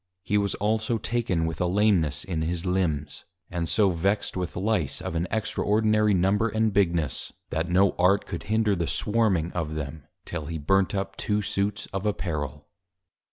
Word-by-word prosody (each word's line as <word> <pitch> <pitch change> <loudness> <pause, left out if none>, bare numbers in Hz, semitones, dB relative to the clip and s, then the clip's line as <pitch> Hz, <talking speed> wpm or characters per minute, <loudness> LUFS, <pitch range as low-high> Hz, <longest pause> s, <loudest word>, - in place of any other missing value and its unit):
He 105 - -1
was 100 -1 +2
also 110 +2 0
taken 110 -8 0
with 80 0 -3
a 90 - +2
Lameness 90 -7 +2
in 85 -4 -3
his 85 +2 -2
Limbs; 80 -6 -1 0.3
and 85 -2 -2
so 95 +6 +3
vexed 95 +5 0
with 90 -2 -3
Lice 90 -7 0
of - - -5
an 85 +2 -1
extraordinary 105 -1 +2
Number 100 +5 +2
and 110 0 +1
Bigness, 85 -7 0 0.2
that 80 +2 -1
no 95 +2 +4
Art 95 +3 +4
could 85 -3 -6
hinder 110 -2 +2
the 85 -2 -1
Swarming 105 -7 +1
of 80 -3 -3
them, 75 +1 -6 0.2
till 80 -4 -5
he 80 - -3
burnt 95 +6 +2
up 95 0 -3
two 105 0 0
Suits 100 +3 -1
of 95 +2 -2
Apparel. 75 -7 -3
95 Hz, 170 wpm, -26 LUFS, 80-105 Hz, 0.3 s, no